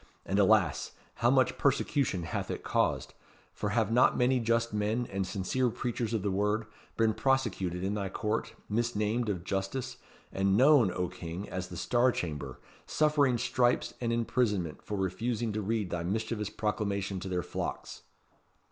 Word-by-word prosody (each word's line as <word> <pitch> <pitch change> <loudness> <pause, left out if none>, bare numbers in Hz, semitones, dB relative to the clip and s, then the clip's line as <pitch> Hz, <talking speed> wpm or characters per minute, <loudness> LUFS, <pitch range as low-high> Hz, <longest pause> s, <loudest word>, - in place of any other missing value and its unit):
And, 100 - 0
alas! 100 -6 +3 0.2
how 120 - +3
much 130 -1 +3
persecution 135 - +1
hath 85 - -3
it - - -4
caused; - - 0 0.4
for 105 - -2
have 110 0 +1
not 125 +2 +4
many 125 +1 +3
just 115 0 +1
men, 105 +3 0
and 95 -1 -1
sincere 105 +7 0
preachers 120 0 -3
of 105 - -1
the 100 - 0
Word, 105 +3 0 0.3
been 115 -1 +3
prosecuted 105 -10 0
in 95 +2 0
thy 100 -2 -2
Court, 110 +3 -2
misnamed 115 0 0
of 90 -4 -2
justice, 110 +7 -3 0.3
and 95 +1 +2
known, 130 -6 +6
O 90 0 -1
King! 90 +2 -6
as 95 0 -4
the 90 - -8
Star 125 +6 +3
Chamber; 75 - -4 0.3
suffering 145 -5 +3
stripes 125 +1 +1
and 115 -1 0
imprisonment 110 -8 0
for 105 - -4
refusing 110 +4 -1
to 110 - -1
read 105 -2 -1
thy 85 - -1
mischievous 105 +3 -2
proclamation 100 -3 -2
to 95 - -6
their 90 -1 -1
flocks." - - -5
105 Hz, 160 wpm, -30 LUFS, 95-120 Hz, 0.4 s, known